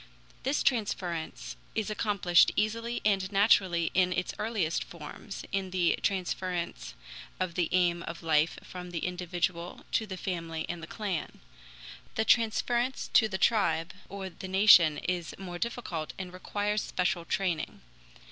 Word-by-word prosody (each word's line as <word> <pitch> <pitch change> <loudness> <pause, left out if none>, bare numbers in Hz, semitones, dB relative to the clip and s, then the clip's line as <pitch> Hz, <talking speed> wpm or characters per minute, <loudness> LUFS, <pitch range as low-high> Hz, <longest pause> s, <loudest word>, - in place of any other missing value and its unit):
This 270 +3 0
transference 185 -9 -1 0.2
is 220 -1 -1
accomplished 200 -5 +4
easily 230 +3 -1
and 195 -2 +2
naturally 190 -5 +4
in 180 -1 +3
its 180 0 -1
earliest 210 -7 0
forms, 170 +5 -9
in 195 -1 -1
the 180 -2 +2
transference 185 -2 -2 0.4
of 185 -2 -1
the 175 -1 0
aim 175 -1 +2
of 165 0 -7
life 160 0 +2
from 180 -1 -8
the 170 -2 -3
individual 175 -1 -3
to 220 - +1
the 190 -2 -5
family 165 -3 -3
and 175 -1 -5
the - - -7
clan. 200 -7 -4 0.8
The 220 - +1
transference 240 +3 +2
to 220 - +6
the 190 -3 -3
tribe 190 -6 +2 0.2
or 195 -1 -5
the 190 - -8
nation 185 -5 +7
is 175 -2 -3
more 180 -2 -6
difficult 185 -9 -3
and 180 -1 -6
requires 205 +3 -1
special 180 -1 -1
training. 175 -3 -2
185 Hz, 140 wpm, -30 LUFS, 170-210 Hz, 0.8 s, nation